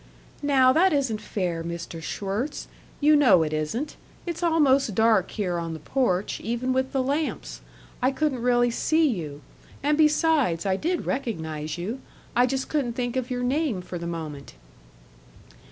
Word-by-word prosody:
"Now 265 -3 +4
that 365 +4 +4
isn't 265 -7 0
fair, 175 -4 -2
Mr. 170 0 -6
Schwirtz; 205 - -3 0.3
you 300 +1 +5
know 220 - +6
it 155 -1 -3
isn't 190 - -3 0.3
it's 340 -1 -4
almost 280 - +3
dark 220 -3 +3
here 180 -5 -2
on 165 -1 -4
the 160 - -6
porch, 195 - 0
even 240 +3 -1
with 260 0 0
the 265 -1 0
lamps. 290 +4 -2 0.4
I 255 - +4
couldn't 270 -2 -1
really 245 0 +3
see 315 +6 +2
you. 155 - -4 0.4
And, 295 +2 +2
besides, 300 - +3
I 190 -1 +2
did 340 - -1
recognize 160 - -3
you 215 +10 -4 0.3
I 245 +1 +4
just 265 +1 -2
couldn't 275 -6 -1
think 245 0 -3
of 255 -1 -2
your 250 -1 -2
name 255 - 0
for 180 -1 -6
the 170 - -5
moment." 155 - -6
245 Hz, 160 wpm, -25 LUFS, 180-280 Hz, 0.4 s, know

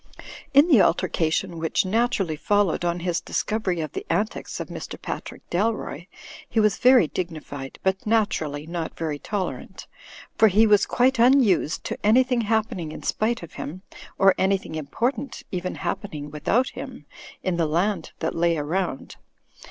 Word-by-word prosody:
In 285 +4 +6
the 270 - +6
altercation 165 +1 +1
which 160 +3 0
naturally 200 -5 +1
followed 205 +1 +1
on 175 0 -1
his 175 -1 -1
discovery 190 -6 -1
of 155 -3 -4
the - - -5
antics 215 +2 -2
of - - -4
Mr. - - -7
Patrick - - -7
Dalroy, 185 -3 -1 0.4
he 225 - +1
was 215 -1 +3
very 250 -8 +6
dignified, 150 -7 -6
but 190 +2 0
naturally 160 -10 0
not 170 0 -5
very 155 -3 -3
tolerant; 200 +2 -5 0.5
for 220 - +6
he 215 +3 +5
was 210 -2 +4
quite 255 0 +2
unused 235 - +4
to - - -4
an3rthing 250 +3 +3
happening 215 -7 -1
in - - -9
spite 225 -1 0
of 170 - -10
him, 180 +6 -7 0.3
or 195 -1 +6
an3rthing 190 -3 0
important 235 - -3
even 180 0 -3
happening 155 -5 -4
without 180 - +1
him, - - -9 0.4
in 185 -2 0
the 165 -2 +1
land 180 +7 0
that 160 - -1
lay 170 0 +2
around. 155 0 -3
190 Hz, 150 wpm, -24 LUFS, 165-220 Hz, 0.5 s, In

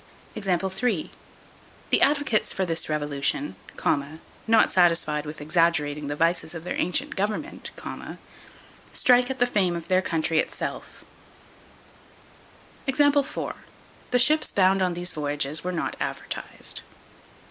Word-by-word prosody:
The 190 0 -1 0.9
advocates 280 -6 +3
for 190 - -1
this 165 -2 0
revolution, 150 - -1 0.9
not 225 -1 +5
satisfied 165 -4 +3
with 150 +1 -7
exaggerating 150 -2 +1
the 145 - -3
vices 165 +1 +1
of 165 - -6
their 180 - -4
ancient 180 - 0
government, 210 +10 -3 1.2
strike 250 0 +4
at 265 - -3
the 245 - +3
fame 195 -7 +1
of 170 +1 -7
their 185 0 +4
country 160 -2 0
itself. - - -4 1.8
The 285 +1 +3 0.9
ships 305 +6 +4
bound 190 0 +3
on 180 -2 +1
these 175 0 -1
voyages 145 0 -1
were 180 - -2
not 175 - -3
advertised. - - -4
180 Hz, 110 wpm, -25 LUFS, 155-225 Hz, 1.8 s, not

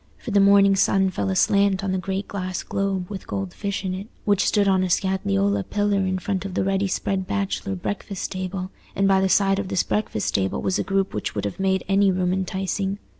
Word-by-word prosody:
For - - -7
the 205 - +4
morning 200 0 +6
sun 195 0 +3
fell 100 - -2
aslant 200 - +2
on 195 - -1
the 190 - 0
great 195 +2 -3
glass 185 -2 -4
globe 195 -2 -2
with 195 -1 -8
gold 195 -2 -4
fish 200 -1 -3
in 185 - -1
it, 190 +3 -6 0.2
which 205 -1 +3
stood 205 -2 +3
on 190 -1 +3
a 185 - -1
scagliola 100 - +1
pillar 205 -1 +1
in 185 0 0
front 190 0 -2
of 195 -2 -6
the - - +1
ready 195 +1 +1
spread 190 0 -2
bachelor 195 -1 -2
breakfast 195 +1 -4
table, 185 0 -4 0.2
and 195 0 +2
by 190 -1 +4
the 190 - +2
side 195 0 +3
of 200 - -3
this 185 - +1
breakfast 210 - -1
table 95 -1 0
was 190 - 0
a - - +1
group 195 +1 0
which 105 - -3
would 105 - -2
have 100 - -4
made 190 -1 +1
any 195 +1 +4
room 180 -1 0
enticing. 190 +1 -2
190 Hz, 225 wpm, -23 LUFS, 185-195 Hz, 0.2 s, morning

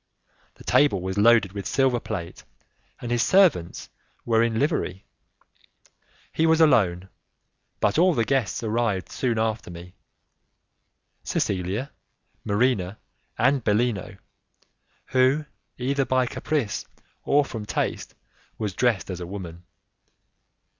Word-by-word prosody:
The - - -15
table 145 -10 +3
was 95 +2 -3
loaded 115 -3 +5
with 100 -1 -5
silver 130 0 +2
plate, 90 -8 -6 0.6
and 120 - -5
his 120 -1 +2
servants 170 - +3 0.4
were 115 -1 +3
in 115 -1 +1
livery. 115 - -1 1.3
He 160 - +2
was 160 0 +4
alone, 95 - +3 0.7
but - - +1
all 180 -1 +4
his 115 -3 +1
guests 125 -6 -1
arrived 110 -4 -1
soon 120 -4 -1
after 110 -2 -1
me 85 +1 -10 1.3
Cecilia, 100 +7 -2 0.5
Marina, 105 -3 0 0.4
and 135 +1 +2
Bellino, 105 -1 0 0.9
who, 130 +4 +2 0.3
either 135 +2 0
by 130 -1 +2
caprice 130 -3 -2 0.4
or 145 0 +3
from 110 -5 -7
taste, - - -3 0.4
was 105 -3 -3
dressed 115 -3 0
as 90 - -5
a 90 - -6
woman. 90 -3 -8
115 Hz, 115 wpm, -24 LUFS, 95-130 Hz, 1.3 s, loaded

